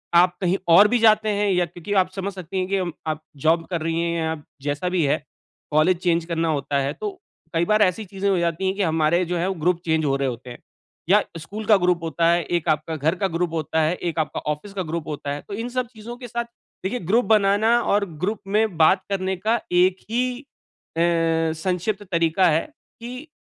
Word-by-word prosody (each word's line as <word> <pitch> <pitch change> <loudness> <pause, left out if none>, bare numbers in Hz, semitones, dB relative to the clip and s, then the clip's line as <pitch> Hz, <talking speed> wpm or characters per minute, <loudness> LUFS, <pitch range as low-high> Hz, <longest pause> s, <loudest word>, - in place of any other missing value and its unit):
आप 180 +1 +5
कहीं 185 +1 +2 0.2
और 200 +5 +8
भी 245 +3 +2
जाते 215 -1 +4
हैं 205 0 +1
या 180 -1 +2
क्योंकि 175 +4 -6
आप 185 - -3
समझ 195 0 -3
सकती 185 0 -6
हैं 185 - -1
कि 195 +1 0
अम, 180 -2 -2 0.2
आप 155 -1 -2 0.2
जॉब 165 +4 +2
कर 170 -3 -2
रही 165 +1 -1
हैं 170 0 -1
या 160 0 -1 0.3
जैसा 145 +5 -2
भी 180 -2 +1
है। 140 +1 0 0.5
कॉलेज 155 +4 +3
चेंज 170 -2 +1
करना 165 -1 -1
होता 140 -2 0
है 140 +1 -1
तो 425 - -4 0.4
कई 165 +1 +2
बार 215 +3 +3
ऐसी 205 +2 +2
चीज़ें 195 +1 -2
हो 195 - +2
जाती 170 +2 -1
हैं 190 +1 0
कि 205 - -2
हमारे 160 +1 +2
जो 175 +1 -2
हैं 170 +2 0
वो 190 - 0
ग्रुप 180 -1 +3
चेंज 160 -1 +1
हो 135 -1 +2
रहे 135 0 0
होते 125 0 -6
हैं, 120 - -8 0.5
या 210 +3 +6 0.2
स्कूल 205 +7 -7
का 215 - +6
ग्रुप 180 -2 +1
होता 165 +1 0
है, 170 0 +2
एक 170 0 -2
आपका 155 +1 0
घर 155 +4 0
का 195 - +3
ग्रुप 170 -1 -1
होता 160 0 0
है, 160 +3 +1
एक 170 -2 -3
आपका 155 - -1
ऑफ़िस 175 +7 -6
का 190 -2 -2
ग्रुप 165 0 -4
होता 145 -1 -4
है। 145 +1 -4
तो - - -7
इन 245 - -4
सब 250 0 -2
चीज़ों 230 0 -9
के 245 -1 -8
साथ 235 +1 -2 0.4
देखिए, 230 +7 -2
ग्रुप 220 +8 +2
बनाना 215 +2 +4
और 205 -2 +1 0.2
ग्रुप 210 +3 -1
में 210 -2 +1
बात 165 +4 +5
करने 190 -1 -1
का 220 +5 +1
एक 180 +1 +4
ही 250 +3 -1 0.5
अ, - - +2 0.6
संक्षिप्त 185 +4 -2
तरीका 170 +2 +3
है, 160 +1 +1 0.3
कि 250 +5 -8
180 Hz, 230 wpm, -23 LUFS, 160-205 Hz, 0.6 s, और